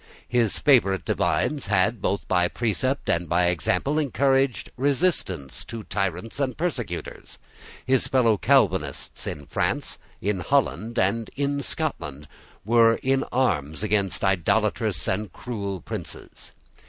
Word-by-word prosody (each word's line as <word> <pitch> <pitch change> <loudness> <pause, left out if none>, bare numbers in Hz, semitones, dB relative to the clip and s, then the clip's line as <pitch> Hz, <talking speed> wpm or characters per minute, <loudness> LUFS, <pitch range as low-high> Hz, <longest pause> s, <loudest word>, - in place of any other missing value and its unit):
His 120 -4 +1
favourite 115 -10 +3
divines 150 -6 0
had, 105 +2 +2
both 100 - -1
by 90 -1 +3
precept 120 +6 -1
and 85 -1 0
by 90 +2 +3
example, 90 - 0
encouraged 135 -2 +1
resistance 130 - -1
to 115 -2 -7
tyrants 100 - -3
and 135 -2 -1
persecutors. 125 - -4 0.5
His 130 -1 +2
fellow 120 -4 +3
Calvinists 95 - +1
in 75 -1 -5
France, - - -2 0.2
in 100 -1 -1
Holland, 120 +1 0
and 110 +3 +1
in 140 0 0
Scotland, 75 - -3 0.4
were 115 0 +5
in 135 0 +2
arms 80 - 0
against 100 -3 0
idolatrous 95 -4 +1
and 105 +2 -1
cruel 100 -7 -5
princes. - - -8
110 Hz, 120 wpm, -25 LUFS, 95-130 Hz, 0.5 s, were